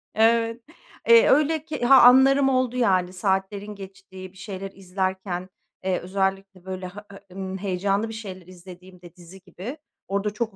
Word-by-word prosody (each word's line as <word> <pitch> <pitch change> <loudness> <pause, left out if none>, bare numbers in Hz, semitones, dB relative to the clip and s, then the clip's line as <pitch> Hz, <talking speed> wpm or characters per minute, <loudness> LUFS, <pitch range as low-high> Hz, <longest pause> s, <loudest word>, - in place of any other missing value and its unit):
Evet. 230 +1 +2 0.5
Eee, 465 +1 +7
öyle 305 +2 +2
ki 300 -5 -4
ha, 265 +1 +7
anlarım 270 +2 +6
oldu, 255 -2 0
yani 185 -6 +1
saatlerin 195 +2 -2
geçtiği 190 -1 -11
bir 190 - -19
şeyler 195 -1 -7
izlerken, 190 -1 -4 0.3
eee, 185 -1 0
özellikle 195 0 -3
böyle, 185 -1 -6
ha 205 +3 -11 0.2
e - - -16
ımm, 190 0 -5
heyecanlı 200 +3 -1
bir - - -7
şeyler 190 -5 -9
izlediğimde, 180 -1 -14
dizi 180 +2 -15
gibi, 215 - -9 0.3
orada 200 +1 -1
çok 220 -1 -4
195 Hz, 155 wpm, -24 LUFS, 185-225 Hz, 0.5 s, Eee